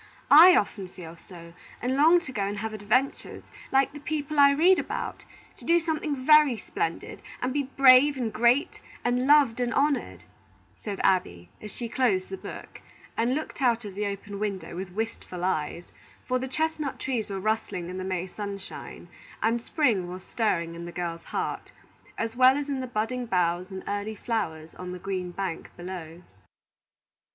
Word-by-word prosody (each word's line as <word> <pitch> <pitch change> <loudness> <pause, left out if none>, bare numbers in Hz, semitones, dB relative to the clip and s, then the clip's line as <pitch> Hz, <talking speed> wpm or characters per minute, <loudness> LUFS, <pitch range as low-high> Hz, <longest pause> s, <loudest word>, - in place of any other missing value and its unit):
I 340 +5 +10
often 200 - 0
feel 170 -2 -11
so, 170 -1 -13 0.3
and 250 +2 -1
long 320 +5 +6
to 295 - -8
go 220 -6 -3
and 200 +1 -2
have 220 +1 -4
adventures, 215 +6 -1 0.3
like 270 0 +3
the 295 - -8
people 295 0 -3
I 280 0 +8
read 335 +7 +4
about; - - -5 0.3
to - - -15
do 340 +1 +4
something 310 -5 -3
very 300 -5 +6
splendid, 165 -5 -4 0.2
and 255 +1 -2
be 280 -2 -1
brave 275 +1 +7
and 230 -4 -2
great 240 +7 +2 0.3
and 250 +2 +1
loved 280 -5 +5
and 245 -1 0
honored," 280 +3 0 0.5
said 205 -3 -6
Abby, 90 - +1
as 210 - -7
she 235 +3 -5
closed 225 -7 +1
the 190 - -5
book, - - -10 0.3
and 240 +3 +1
looked 310 -1 -5
out 235 -3 +2
of 200 - -7
the 205 +2 -2
open 200 0 -6
window 195 -6 -4
with 185 +1 -5
wistful 185 -3 -5
eyes; 170 -1 -2 0.3
for 255 0 0
the 260 - -4
chestnut 310 0 -2
trees 245 -5 -3
were 195 -1 -3
rustling 210 -4 -2
in 185 +1 -6
the - - -4
May 185 -1 -2
sunshine, 200 0 -8 0.4
and 230 +1 +1
spring 230 - +1
was 185 +1 -8
stirring 170 -7 -1
in 170 0 -7
the 175 - -7
girl's 170 -1 -5
heart, - - -4 0.5
as 225 0 -3
well 255 +2 +6
as 290 0 -4
in 275 -2 -1
the 255 - -4
budding 245 +2 -2
boughs 180 -1 0
and 190 -1 -7
early 205 +2 -3
flowers 165 -9 -3
on 180 0 -7
the - - -6
green 185 -1 -4
bank 175 -2 -5
below. 175 -1 -8
220 Hz, 180 wpm, -27 LUFS, 185-265 Hz, 0.5 s, I